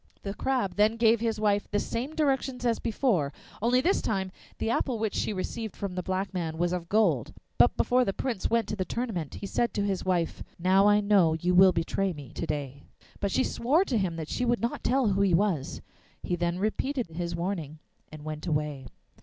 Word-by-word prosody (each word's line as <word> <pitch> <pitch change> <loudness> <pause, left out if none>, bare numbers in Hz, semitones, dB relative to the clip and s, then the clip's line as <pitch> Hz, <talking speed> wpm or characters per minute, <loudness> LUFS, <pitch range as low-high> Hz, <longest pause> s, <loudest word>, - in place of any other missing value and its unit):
The 200 - -3
Crab 245 -5 -1
then 215 +2 +4
gave 230 0 +4
his 225 -1 -1
wife 205 -1 +1
the 205 - 0
same 250 +8 -3
directions 265 -4 0
as 235 -1 +2
before, 210 - 0 0.3
only 245 +3 +3
this 370 +8 +2
time 190 -3 -1 0.3
the 225 - -1
apple 240 0 0
which 220 -2 -1
she - - -1
received 215 +3 -4
from 200 -2 -4
the 180 - -2
black 190 +2 -2
man 165 -3 -3
was 175 +1 0
of 170 -2 -4
gold. 215 +1 +2 0.2
But - - +5
before 250 +1 +3
the 195 - 0
Prince 230 -1 -2
went 230 -2 +1
to - - -2
the 190 - -1
tournament 190 - -4
he - - -6
said 235 +4 -1
to 205 - +1
his 195 -2 -1
wife, 175 -3 0 0.2
'Now 190 +3 +4
I 210 0 +5
know 200 -6 +4
you 175 +3 0
will 185 +1 +7
betray 180 +3 -1
me 145 -5 -10
to 165 - -4
day.' 140 -2 -4 0.4
But 200 - 0
she 260 - +2
swore 290 +12 +2
to 250 - 0
him 180 -4 -1
that 160 -2 -5
she 250 - -2
would 240 -1 +2
not 235 - -2
tell 265 +1 +2
who 195 0 +1
he 190 -4 +4
was. 175 -7 -1 0.4
He 175 - -1
then 175 0 -1
repeated 240 +6 -1
his 170 +1 -4
warning 170 -4 -3 0.3
and 155 -1 -10
went 155 +2 -5
away. 150 -4 -2
195 Hz, 215 wpm, -28 LUFS, 170-230 Hz, 0.4 s, will